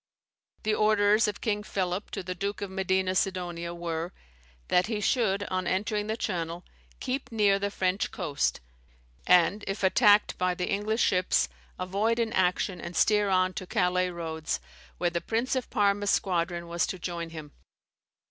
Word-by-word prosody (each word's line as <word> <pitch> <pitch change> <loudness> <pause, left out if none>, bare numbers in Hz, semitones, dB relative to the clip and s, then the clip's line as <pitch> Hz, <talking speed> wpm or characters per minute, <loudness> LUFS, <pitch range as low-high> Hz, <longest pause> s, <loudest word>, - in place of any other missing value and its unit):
The 215 -1 +1
orders 215 0 +4
of 210 - -4
King 210 -2 0
Philip 190 -1 -2
to 195 - -5
the 185 +1 -4
Duke 200 +3 -3
de 200 - -4
Medina 190 0 0
Sidonia 175 -3 -1
were, 170 0 -4 0.6
that 180 +2 +3
he 220 -2 -2
should, 205 -2 +1
on 185 -1 -1
entering 210 +3 -1
the 220 +1 -2
Channel, 170 -5 -3 0.3
keep 260 0 -3
near 205 -3 +3
the 200 +1 -1
French 190 -1 0
coast, 160 -7 -1 0.7
and, 180 +4 +4
if 195 +1 -3
attacked 205 +1 +4
by 180 0 +1
the 180 - -2
English 215 +3 +1
ships, 185 -1 +2 0.3
avoid 200 +5 0
an 230 -2 0
action, 180 0 +1
and 175 0 -7
steer 210 -1 +3
on 185 -1 +2
to 185 - -6
Calais 180 0 +1
roads, 160 -2 -3 0.4
where 175 -1 0
the 170 0 -2
Prince 230 +8 -1
of 255 - -2
Parma's 205 -2 +2
squadron 170 -2 0
was 170 0 0
to 185 - -4
join 170 -1 -4
him. 155 -3 -9
190 Hz, 165 wpm, -28 LUFS, 175-210 Hz, 0.7 s, orders